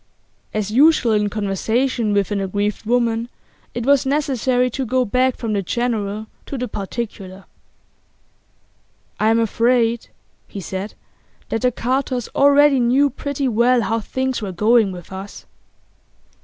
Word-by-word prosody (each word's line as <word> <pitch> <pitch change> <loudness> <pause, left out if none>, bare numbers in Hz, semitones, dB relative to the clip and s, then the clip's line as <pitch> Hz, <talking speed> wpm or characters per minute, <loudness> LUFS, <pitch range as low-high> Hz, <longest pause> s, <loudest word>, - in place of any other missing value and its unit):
As 215 -1 -2
usual 280 -1 +4
in 210 -1 +2
conversation 220 +3 -1
with 200 0 +1
an 200 -1 0
aggrieved 205 +2 -2
woman 235 -1 +1 0.5
it 240 -1 -3
was 280 -1 +4
necessary 265 -3 +1
to 265 - -3
go 255 +1 +1
back 255 +3 +1
from 225 -3 -3
the 200 - 0
general 215 0 -2 0.2
to 275 - -5
the 250 0 -3
particular. 195 -3 -6 1.7
'I'm 220 +1 +3
afraid,' 230 +1 +1 0.4
he 200 - -8
said, 190 +3 -5 0.5
'that 225 - -2
the 250 0 +2
Carters 255 0 -2
already 285 0 +5
knew 260 +4 +3
pretty 280 +1 -3
well 240 +1 +3
how 225 +2 0
things 260 +3 -2
were 200 -3 -4
going 215 +2 +3
with 180 -1 -10
us. 190 +2 -8
235 Hz, 135 wpm, -20 LUFS, 210-255 Hz, 1.7 s, already